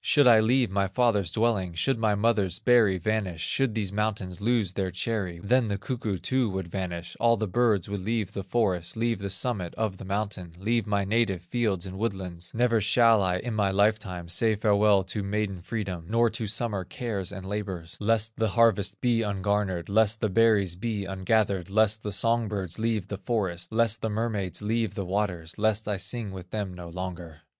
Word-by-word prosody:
Should 145 -3 +4
I 115 -2 +8
leave 120 0 +2
my 100 0 +1
father's 100 -4 +1
dwelling, 100 -5 0
Should 115 +8 +1
my 110 -2 +2
mother's 100 -4 +1
berry 115 -6 +4
vanish, 95 -3 -2
Should 130 +3 0
these 100 -4 -1
mountains 100 -3 -2
lose 110 -4 +1
their 95 -1 -1
cherry, 95 -2 -3
Then 125 +3 +3
the 100 -1 -1
cuckoo 110 -2 -3
too 130 +5 0
would 95 -2 -4
vanish, 85 -2 -5
All 115 0 +4
the 110 - -1
birds 105 -2 +2
would 100 0 -3
leave 105 0 -2
the 100 - -4
forest, 95 -3 -1
Leave 115 -2 0
the 100 0 -4
summit 100 -3 -1
of 105 -4 -2
the - - -9
mountain, 100 -3 -3
Leave 110 +4 0
my 100 -1 +1
native 100 -4 +1
fields 100 -3 -1
and 95 0 -7
woodlands, 95 -6 -4
Never 115 -1 +2
shall 115 +1 +5
I, 90 -1 +1
in 120 +5 -4
my 105 -2 +1
life 105 +3 +3
time, 90 -5 -7
Say 110 +6 +2
farewell 105 -1 +3
to 95 +3 -4
maiden 100 -2 -2
freedom, 95 -5 -4
Nor 115 +1 +3
to 110 0 -3
summer 105 -2 -2
cares 100 -2 -4
and 95 -1 -8
labors, 95 -4 -4
Lest 110 +1 +1
the 110 -1 +1
harvest 110 -2 +2
be 120 -2 +2
ungarnered, 100 -3 -1
Lest 110 +2 +2
the 110 - 0
berries 100 -3 +3
be 105 0 -3
ungathered, 95 -1 0
Lest 110 +1 +2
the 105 - -4
song 115 +3 +2
birds 95 -3 -4
leave 110 -4 -1
the 100 - -5
forest, 95 -6 -2
Lest 115 0 +2
the 110 - -1
mermaids 105 -3 -2
leave 110 -2 -1
the 100 - -3
waters, 90 -4 -2
Lest 110 0 +1
I 105 -2 -1
sing 105 +2 -3
with 90 -1 -9
them 100 -3 -3
no 90 -1 -9
longer." 90 -2 -7
105 Hz, 195 wpm, -27 LUFS, 95-115 Hz, -, I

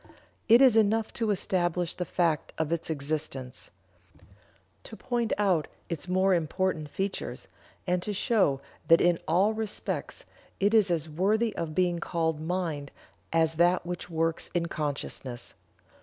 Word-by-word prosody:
It 235 +4 +8
is 255 -4 +6
enough 220 0 +2
to 225 -2 -1
establish 180 -3 0
the 180 - -4
fact 165 -4 0
of 160 0 -1
its 170 -1 -2
existence; 140 -4 -4 1.1
to - - -10
point 240 -2 -1
out 185 -7 +2 0.2
its 170 0 -4
more 185 +1 +3
important 165 -1 -1
features; 195 +5 -4 0.4
and 180 -1 +1
to 210 - -3
show 190 - +1 0.3
that 165 - +7
in 175 -1 +3
all 190 +7 +3
respects 220 -1 -4 0.3
it 200 +2 +2
is 215 -4 +5
as 165 -2 0
worthy 205 +8 +1
of 160 -2 -4
being 175 -2 +2
called 160 -3 -1
mind 160 -4 -2 0.4
as 160 -1 +2
that 175 0 +3
which 180 0 -5
works 165 0 -1
in 170 -1 +1
consciousness. 140 -5 -4
175 Hz, 140 wpm, -28 LUFS, 160-195 Hz, 1.1 s, It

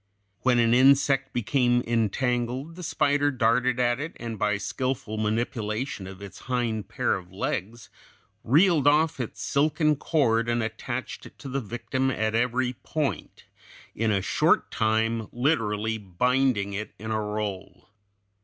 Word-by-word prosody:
When 125 +2 +2
an 115 -1 +4
insect 135 +1 +4
became 120 +1 +1
entangled, 120 +5 -1
the 180 - -9
spider 145 -3 +1
darted 125 -1 +1
at 120 0 +2
it, 155 +3 -6
and 115 -3 -6
by 105 -1 +1
skillful 125 -1 -3
manipulation 110 0 -2
of 95 +1 -10
its 100 - -10
hind 115 -5 -1
pair - - 0
of 90 -1 -6
legs 105 +4 -4 0.5
reeled 155 - +4
off 150 0 +3
its 115 -2 -5
silken 150 +3 +2
cord 120 -7 +1
and 120 -1 +1
attached 120 +3 -5
it - - -18
to - - -9
the 135 +1 -2
victim 120 +4 -2
at 110 -3 -1
every 125 +2 +1
point, 150 +3 -4 0.5
in 115 0 0
a 100 -3 +1
short - - +2
time 110 0 0
literally 110 -5 0
binding 105 +2 +1
it 105 +2 -5
in 110 +1 -6
a 110 0 0
roll. 105 -3 -5
120 Hz, 145 wpm, -26 LUFS, 110-135 Hz, 0.5 s, an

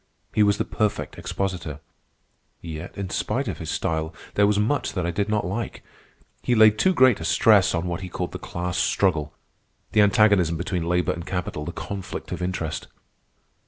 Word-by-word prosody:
He 110 - +2
was 100 0 +4
the - - -1
perfect 105 -1 -2
expositor. 90 -7 -3 0.8
Yet, 80 +3 -7
in 100 -2 -4
spite - - -1
of - - -4
his - - -5
style, 80 0 -2 0.2
there 100 0 +4
was 105 0 +2
much 115 +8 0
that 90 -3 -1
I 85 - 0
did 100 +5 -1
not 105 -1 +1
like. 100 +6 -4 0.6
He 120 - +1
laid 110 -1 +6
too 190 - +4
great 130 - +5
stress 100 +2 +4
on 85 +1 -1
what 85 -1 -3
he 90 - -6
called - - -4
the - - -6
class 90 +2 -3
struggle, 80 -7 +1 0.6
the 105 - +4
antagonism 100 -5 +4
between 85 -1 -2
labor 90 0 +2
and 85 - -6
capital, 90 -4 -4
the - - -4
conflict 100 -2 -6
of - - -4
interest. 85 -4 -3
95 Hz, 180 wpm, -24 LUFS, 85-105 Hz, 0.8 s, laid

